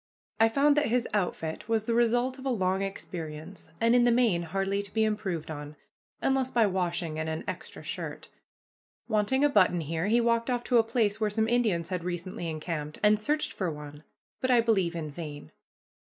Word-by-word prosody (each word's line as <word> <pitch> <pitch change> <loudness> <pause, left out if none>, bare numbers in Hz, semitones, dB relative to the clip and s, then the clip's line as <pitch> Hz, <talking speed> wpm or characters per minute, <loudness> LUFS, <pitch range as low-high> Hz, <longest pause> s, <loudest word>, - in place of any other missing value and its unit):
I 225 0 +6
found 285 +4 +4
that 295 - +3
his 240 +1 +1
outfit 180 -2 -2
was 225 -2 +2
the 230 - -1
result 240 +3 +2
of 260 - -9
a - - +2
long 190 -5 +1
experience, 170 -3 -6
and 230 +1 +4
in 245 0 +5
the 240 - +4
main 230 -8 +3
hardly 195 +4 -1
to 200 -1 -7
be 220 - +2
improved 200 -7 -2
on, 150 0 -7 0.5
unless 265 -1 +2
by 235 -3 +3
washing 175 -4 -1
and 160 0 -2
an 160 0 -3
extra - - -6
shirt. - - -5 0.8
Wanting 225 +5 +1
a - - +7
button 185 -8 +4
here, 160 +4 -2
he 230 +3 +4
walked 230 0 +1
off 245 -1 0
to 245 -1 +3
a - - +5
place 220 -2 0
where 215 - +2
some 220 +1 0
Indians 220 -9 +1
had 180 -3 -3
recently 175 -1 -4
encamped, 155 -1 -4
and 210 0 +5
searched 300 +6 0
for 185 -3 -2
one, 150 -1 -8 0.4
but 260 - -1
I 245 -2 +6
believe 195 -7 +2
in 155 -3 -4
vain. 145 -2 -8
205 Hz, 195 wpm, -28 LUFS, 170-235 Hz, 0.8 s, a